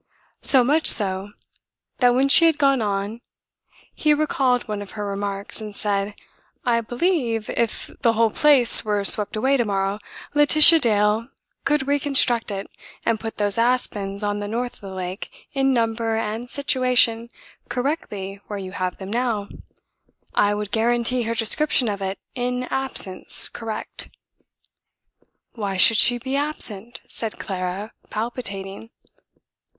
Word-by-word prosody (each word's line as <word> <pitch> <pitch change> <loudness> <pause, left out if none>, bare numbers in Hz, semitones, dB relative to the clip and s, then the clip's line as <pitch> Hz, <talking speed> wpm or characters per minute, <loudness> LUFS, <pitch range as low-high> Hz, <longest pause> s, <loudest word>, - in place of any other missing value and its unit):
So 260 -3 +5
much 300 +6 +2
so 195 -1 +2 0.7
that 245 -1 +4
when 265 +2 +3
she 315 +4 +8
had 325 -3 +3
gone 275 -3 +2
on 205 +2 -3 0.7
he 300 -1 +2
recalled 265 -5 0
one 210 -1 -4
of 200 - -10
her 210 - -3
remarks, 200 +1 -5
and 210 -1 -8
said: 200 0 -2 0.5
"I 235 -1 +2
believe, 240 - -1
if 230 -2 -2
the 230 -3 +3
whole 225 0 +2
place 275 -4 +4
were 205 -2 -1
swept 205 +1 +3
away 265 +6 +2
to 240 - 0
morrow, 195 0 -1 0.3
Laetitia 305 +2 +7
Dale 215 -2 +1 0.4
could 295 -2 +1
reconstruct 275 -5 +2
it 195 -1 -5 0.4
and 230 -2 +1
put 225 0 -7
those 205 +1 -1
aspens 210 -5 -1
on 205 0 -1
the 205 - -4
north 240 +3 -3
of - - -27
the 195 - -8
lake 185 0 -6 0.2
in 270 -1 +1
number 225 -2 0
and 225 +2 -4
situation 250 -4 +1 0.4
correctly 210 -8 -4
where 205 - -5
you 190 -1 -7
have 185 -2 -3
them 190 0 -8
now. 230 -4 -1 0.8
I 205 0 +2
would 210 -1 -5
guarantee 240 +2 +1
her 230 - -1
description 245 +3 +2
of 200 -2 -3
it 195 0 -3 0.2
in 250 0 -2
absence 265 -8 +1
correct." 225 -2 -6 1.4
"Why 200 -4 -4
should 220 +4 +7
she 245 +2 +4
be 260 +3 -4
absent?" 240 -7 -4
said 225 -2 -6
Clara, 190 +2 -5 0.2
palpitating. 210 -2 -5
225 Hz, 145 wpm, -22 LUFS, 205-250 Hz, 1.4 s, she